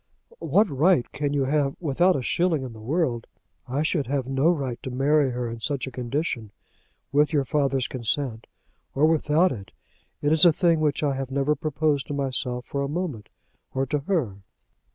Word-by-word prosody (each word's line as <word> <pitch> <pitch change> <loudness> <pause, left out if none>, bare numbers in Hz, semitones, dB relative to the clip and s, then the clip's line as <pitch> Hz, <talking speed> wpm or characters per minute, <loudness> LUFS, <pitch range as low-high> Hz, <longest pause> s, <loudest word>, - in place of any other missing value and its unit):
"What 210 +1 +3
right 150 -1 +3
can 145 0 -2
you 145 -1 +1
have, 140 0 +1
without 175 +4 +2
a 130 - -2
shilling 170 -1 +1
in 125 -3 -7
the 110 - -12
world 125 -2 -1 0.2
?" - - -47
"I 135 +4 -1
should 155 -4 0
have 135 -1 -1
no 135 +4 +2
right 135 -8 -1
to - - -5
marry 140 +2 +2
her 125 -1 -3
in 115 0 -6
such 140 +2 -2
a 130 - -7
condition, 120 -3 -3 0.6
with 150 +1 +3
your 140 -3 +2
father's 135 -1 +1
consent 120 -1 -2 0.5
or 145 +3 +4
without 160 +2 +3
it. 100 -5 -8 0.5
It 145 - +2
is 160 -1 +4
a 175 - +8
thing 170 -1 +2
which 150 -1 0
I 145 -2 +2
have 135 -1 -4
never 140 +2 +1
proposed 150 -2 0
to 145 - -3
myself 125 -2 -2
for 140 - -3
a 140 - -2
moment, 150 - -4 0.5
or 135 +1 +1
to 145 +3 -1
her." 140 - -1
140 Hz, 195 wpm, -25 LUFS, 130-155 Hz, 0.6 s, a